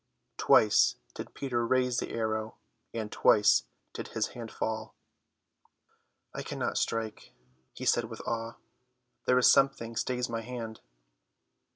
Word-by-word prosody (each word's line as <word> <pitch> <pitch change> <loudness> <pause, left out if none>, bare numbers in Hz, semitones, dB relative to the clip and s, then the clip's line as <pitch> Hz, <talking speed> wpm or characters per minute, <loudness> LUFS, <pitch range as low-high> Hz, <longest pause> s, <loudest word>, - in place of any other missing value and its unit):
Twice 105 -1 +5 0.2
did - - -8
Peter 125 -4 -1
raise 125 0 +2
the - - -2
arrow, 110 -1 -2 0.3
and 110 -2 -4
twice 105 -1 +5 0.3
did - - -6
his 110 -1 -2
hand 115 -2 -8
fall. 110 0 -4 1.4
"I - - -4
cannot - - -2
strike," 110 -1 -3 0.4
he - - -6
said 120 - +3
with 115 0 -8
awe, 115 0 -3 0.7
"there 125 - +5
is 125 - +4
something 135 -4 +2
stays 125 +2 -1
my 115 -1 -3
hand." 115 -2 -6
115 Hz, 130 wpm, -30 LUFS, 110-125 Hz, 1.4 s, Twice